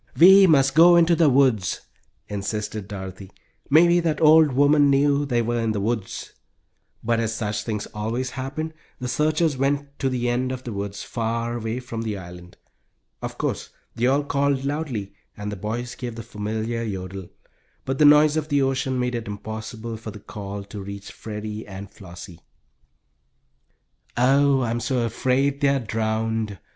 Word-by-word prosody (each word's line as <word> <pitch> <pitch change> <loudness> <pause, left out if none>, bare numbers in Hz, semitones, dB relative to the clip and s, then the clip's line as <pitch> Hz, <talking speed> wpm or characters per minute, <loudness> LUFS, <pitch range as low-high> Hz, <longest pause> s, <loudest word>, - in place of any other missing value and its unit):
"We 190 +3 +8
must 135 -4 +4
go 170 +3 +7
to 170 0 +4
the 160 -3 +4
woods," 125 -9 +2 0.5
insisted 105 0 -4
Dorothy. 95 -1 -8 0.4
"Maybe 170 +4 +6
that 165 -3 0
old 155 -1 +6
woman 145 +2 +4
knew 140 +1 +2
they 120 -3 +1
were 120 +1 -1
in 115 -1 0
the 105 - -2
woods." 105 -1 -3 0.7
But 115 0 +1
as 115 -1 -1
such 105 -2 -2
things 105 -3 -3
always 115 +5 -3
happen, 140 +5 -4 0.2
the 125 - -5
searchers 155 +2 +1
went 140 +1 -1
to 135 - +1
the 125 -1 -1
end 125 +2 0
of 130 0 -5
the 120 - -5
woods, 100 0 -5
far 115 0 -2
away 115 +1 -3
from 115 -2 -6
the 110 -3 -3
island. 90 -1 -11 0.6
Of - - -6
course - - -3 0.2
they 120 +2 0
all 140 +3 +2
called 140 -1 0
loudly, 140 -10 -3 0.2
and 105 0 -5
the - - -4
boys 115 +5 -4
gave 120 -3 -6
the 115 - -7
familiar 110 +2 -3
yodel, 95 -4 -5 0.6
but 135 0 -2
the - - +5
noise 150 +1 +6
of 155 -1 -1
the 145 -2 +2
ocean 130 -1 0
made 125 0 -1
it 115 -3 -4
impossible 110 +2 -6
for 110 0 -8
the 105 - -9
call 100 0 -7
to 100 0 -8
reach 100 +1 -8
Freddie 105 0 -7
and 100 0 -9
Flossie. 85 -2 -11 1.8
"Oh, 135 +2 +4
I'm 120 -1 -1
so 125 0 0
afraid 130 +4 0
they 140 - +4
are 140 0 +2
drowned!" 110 -2 -2
120 Hz, 170 wpm, -23 LUFS, 105-140 Hz, 1.8 s, We